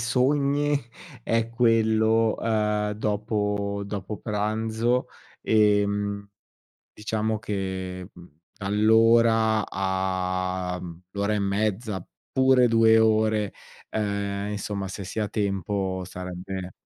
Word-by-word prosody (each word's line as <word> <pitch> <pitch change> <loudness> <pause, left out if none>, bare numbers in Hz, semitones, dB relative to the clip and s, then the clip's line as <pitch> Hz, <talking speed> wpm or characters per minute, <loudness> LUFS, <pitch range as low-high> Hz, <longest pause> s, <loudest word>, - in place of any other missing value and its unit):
sogni 140 +4 +1 0.4
è 115 0 0
quello, 115 -1 +3
uhm, 105 -2 0
dopo 105 -1 -1
dopo 100 +1 -5
pranzo. 110 +3 -1 0.4
Ehm, 100 -1 +2 0.7
diciamo 110 0 -2
che, 95 -3 -4
mhmm, 85 0 -14 0.3
all'ora, 110 +1 +4
a 95 -1 -1
mhmm, 85 -1 -9
a - - -58
l'ora 100 +1 -1
e 105 - 0
mezza, 100 0 -1 0.3
pure 130 -1 +4
2 115 -1 +5
ore, 110 -2 +2 0.4
ehm, 100 -1 -2
insomma 100 -1 -3
se 100 +1 -6
si 95 +4 -5
ha 105 - 0
tempo 100 -2 -2
sarebbe 90 0 -6
105 Hz, 100 wpm, -25 LUFS, 95-110 Hz, 0.7 s, 2